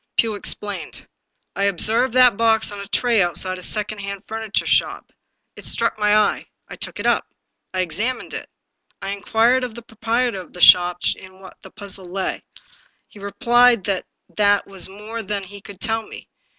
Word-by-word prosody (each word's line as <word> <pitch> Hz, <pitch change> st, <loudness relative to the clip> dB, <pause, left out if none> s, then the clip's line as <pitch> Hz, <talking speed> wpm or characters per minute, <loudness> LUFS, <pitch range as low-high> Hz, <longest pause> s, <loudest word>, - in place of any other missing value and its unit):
Pugh 225 Hz, -2 st, +2 dB
ex 205 Hz, -, -1 dB
plained. 200 Hz, -6 st, -7 dB, 0.2 s
" -, -, -52 dB
I 200 Hz, -, 0 dB
observed 225 Hz, +6 st, +3 dB
that 250 Hz, -3 st, +6 dB
box 225 Hz, -1 st, +2 dB
on 205 Hz, -, -7 dB
a 200 Hz, -, -7 dB
tray 235 Hz, 0 st, +2 dB
outside 185 Hz, +1 st, -1 dB
a -, -, -10 dB
second 210 Hz, +2 st, -3 dB
hand 200 Hz, -1 st, -6 dB
furniture 220 Hz, -1 st, -2 dB
shop. -, -, 0 dB, 0.4 s
It -, -, -10 dB
struck 230 Hz, -2 st, 0 dB
my 210 Hz, 0 st, +4 dB
eye. 210 Hz, -1 st, +1 dB, 0.2 s
I -, -, -9 dB
took -, -, -7 dB
it -, -, -4 dB
up. -, -, +2 dB, 0.4 s
I 185 Hz, -, -1 dB
ex 175 Hz, +2 st, -6 dB
amined 250 Hz, +4 st, -2 dB
it. -, -, -6 dB, 0.5 s
I -, -, -5 dB
inquired 225 Hz, +5 st, +2 dB
of 245 Hz, -3 st, -5 dB
the 235 Hz, -, -9 dB
proprietor 230 Hz, -1 st, -1 dB
of 180 Hz, -, -15 dB
the 180 Hz, -, -10 dB
shop 180 Hz, 0 st, +6 dB
in 190 Hz, 0 st, -15 dB
what 190 Hz, -, -13 dB
the -, -, -12 dB
puzzle 195 Hz, -2 st, -8 dB
lay. 185 Hz, +2 st, -3 dB, 0.7 s
He 205 Hz, -, -15 dB
replied 235 Hz, +2 st, +3 dB
that 190 Hz, -1 st, -2 dB, 0.3 s
that 205 Hz, -1 st, +3 dB
was 195 Hz, -1 st, -3 dB
more 210 Hz, +4 st, -7 dB
than 200 Hz, -1 st, -3 dB
he 200 Hz, +1 st, -10 dB
could 195 Hz, -1 st, -12 dB
tell 225 Hz, +1 st, -1 dB
me. -, -, -11 dB
205 Hz, 190 wpm, -21 LUFS, 195-225 Hz, 0.7 s, that